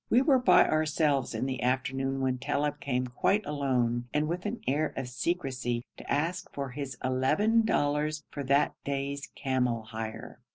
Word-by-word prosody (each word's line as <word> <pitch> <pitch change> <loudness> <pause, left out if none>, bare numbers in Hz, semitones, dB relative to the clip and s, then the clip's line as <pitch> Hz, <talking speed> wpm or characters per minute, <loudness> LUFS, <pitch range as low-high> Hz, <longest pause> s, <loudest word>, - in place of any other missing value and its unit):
We 250 +3 +5
were 270 -2 +5
by 180 -7 +6
ourselves 155 -5 +1
in 110 - -1
the 130 -1 -3
afternoon 135 +1 0
when 130 -1 0
Talib 145 +3 -1
came 125 -2 -1
quite 195 - +1
alone, 125 -5 0
and 150 +1 +2
with 175 +4 -2
an 235 +3 -4
air 145 +4 0
of 130 - -3
secrecy, 125 -4 -2
to - - -8
ask 165 +5 -1
for 140 -1 -4
his 140 0 -5
eleven 165 - +3
dollars 150 -3 +1
for 145 - -4
that 140 +2 +3
day's 140 0 -3
camel 125 -4 0
hire. 110 +1 -7
140 Hz, 165 wpm, -29 LUFS, 125-155 Hz, -, by